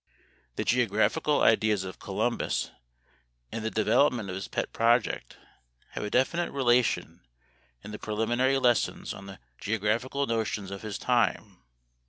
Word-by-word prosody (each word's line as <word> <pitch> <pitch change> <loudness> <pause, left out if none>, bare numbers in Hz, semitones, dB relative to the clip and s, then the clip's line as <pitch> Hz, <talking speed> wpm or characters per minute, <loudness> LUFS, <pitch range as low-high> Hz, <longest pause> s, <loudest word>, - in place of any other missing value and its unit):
The - - -1
geographical 125 +6 +2
ideas 110 -3 +3
of 95 -1 -8
Columbus - - -1 0.8
and 110 - -4
the 110 - 0
development 110 0 +2
of 90 - -4
his 95 - -5
pet - - -3
project 115 - +1 0.5
have - - -5
a 105 - -3
definite 170 +9 +1
relation 125 -3 +1 0.6
to - - -9
the 105 - -7
preliminary 120 +5 +1
lessons 120 -4 +1
on 100 - -10
the 95 -1 -9 0.2
geographical 115 +6 -1
notions 110 -4 -2
of 100 - -6
his 110 -2 -5
time. 115 - 0
110 Hz, 135 wpm, -28 LUFS, 105-125 Hz, 0.8 s, ideas